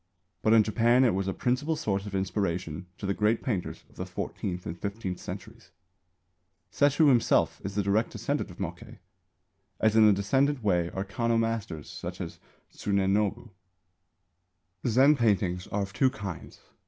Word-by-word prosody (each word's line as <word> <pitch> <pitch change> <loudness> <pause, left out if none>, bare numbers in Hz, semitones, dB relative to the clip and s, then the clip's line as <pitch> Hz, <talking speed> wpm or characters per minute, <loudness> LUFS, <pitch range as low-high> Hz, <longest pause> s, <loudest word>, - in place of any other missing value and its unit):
But 110 - +3
in 110 -1 +7
Japan 120 +4 +3
it 120 - +4
was 95 +1 -1
a - - +1
principal 130 +10 0
source 105 -10 -2
of 100 - -5
inspiration 90 -3 -2
to - - -6
the 100 - +1
great 105 +3 +1
painters 105 -10 -3
of - - -24
the - - -4
fourteenth 90 -2 -4
and 85 - -4
fifteenth 100 -1 -4
centuries. - - -9 1.0
Sesshū 145 +2 +4
himself 120 -4 +3
is 100 0 -5
the 105 - +1
direct 100 +4 +1
descendant - - -2
of - - -12
Mokkei; - - -6 0.8
as 110 0 +3
in 110 -1 +7
a - - +7
decadent 135 +7 +1
way 90 -4 +2
are 95 +2 -4
Kanō 115 +3 0
masters 110 -9 -2
such - - -7
as - - -6 0.3
Tsunenobu. 100 +2 0 1.4
Zen 135 +6 +5
paintings 100 -7 +1
are 100 0 -1
of 95 -1 -7
two 130 +9 +3
kinds. 100 -9 -8
105 Hz, 160 wpm, -28 LUFS, 95-115 Hz, 1.4 s, in